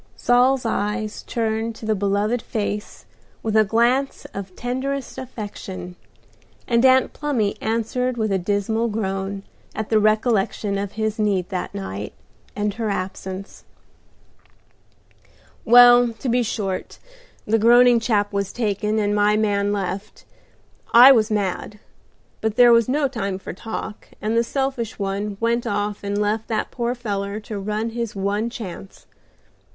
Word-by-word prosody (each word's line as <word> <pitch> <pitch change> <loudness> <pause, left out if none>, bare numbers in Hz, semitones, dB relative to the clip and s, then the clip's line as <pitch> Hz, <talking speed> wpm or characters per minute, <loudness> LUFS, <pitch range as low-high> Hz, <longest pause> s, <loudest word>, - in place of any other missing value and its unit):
Saul's 250 +1 +3
eyes 215 0 -2
turned 225 -1 -2
to 220 - -9
the 220 - +2
beloved 205 +3 0
face 210 -1 -4 0.4
with 220 -1 -1
a 220 - +6
glance 240 +6 +1
of 195 -2 -7
tenderest 260 +2 -3
affection, 205 -7 -7 0.7
and 235 -1 +2
Aunt 260 0 +4
Plumy 250 -9 -1
answered 235 +3 -1
with 215 -2 0
a 190 - +1
dismal 205 +5 0
groan 195 -2 -3 0.3
at 220 -1 -4
the 220 - +4
recollection 215 -2 +1
of 200 -1 -4
his 220 0 -2
need 195 -4 0
that 185 -1 -4
night, 95 +1 -5 0.4
and 205 0 -1
her 225 0 -3
absence. 190 0 -5 2.0
"Well, 245 0 +7
to 235 +3 -5
be 245 +1 +2
short, 205 -4 -3 0.5
the 225 +1 +2
groaning 240 +2 +6
chap 210 -3 0
was 200 -1 -1
taken, 215 -1 -1
and 205 -1 +1
my 210 0 +3
man 205 -1 +1
left. 195 0 -4 0.7
I 250 +3 +10
was 220 -5 +4
mad, 205 0 -2 0.6
but 220 -1 -1
there 240 0 +7
was 230 0 +4
no 285 +2 +2
time 200 -7 -3
for 190 - -8
talk, 215 +2 -7
and 215 +2 -1
the 230 - +3
selfish 260 -2 -2
one 200 +1 -3
went 235 +1 0
off 205 0 -2
and 200 0 -2
left 210 +2 -1
that 220 -2 -2
poor 240 0 -2
feller 205 -3 -3
to 210 -1 -6
run 215 +3 -2
his 235 -2 -4
one 200 +3 -1
chance. 195 -5 -9
215 Hz, 145 wpm, -22 LUFS, 200-235 Hz, 2.0 s, I